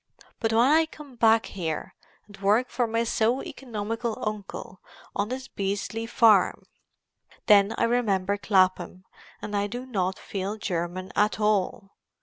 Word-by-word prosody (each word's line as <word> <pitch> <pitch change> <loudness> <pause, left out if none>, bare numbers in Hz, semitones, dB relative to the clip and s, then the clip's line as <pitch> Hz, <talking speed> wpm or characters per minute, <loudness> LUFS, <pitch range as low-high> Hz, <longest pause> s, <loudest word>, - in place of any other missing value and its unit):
But 225 - 0
when 225 +1 +4
I 315 +3 +4
come 295 -4 -13
back 225 -1 +4
here 165 -5 -4 0.3
and 205 - -14
work 215 +6 +3
for 240 -1 0
my 230 +1 0
so 235 +2 +1
economical 230 -1 -4
uncle 205 -2 -6 0.3
on 205 +2 -1
this 260 +1 -5
beastly 205 +3 -3
farm, 220 -6 +4 0.8
then 205 0 +5
I - - +1
remember 205 -5 +1
Clapham 185 -2 +1 0.4
and 210 - -4
I 200 0 +1
do 245 +4 -6
not 190 -7 -1
feel 200 +2 -4
German 180 -1 -3
at 210 +1 +2
all. 205 -2 0
210 Hz, 140 wpm, -26 LUFS, 195-230 Hz, 0.8 s, then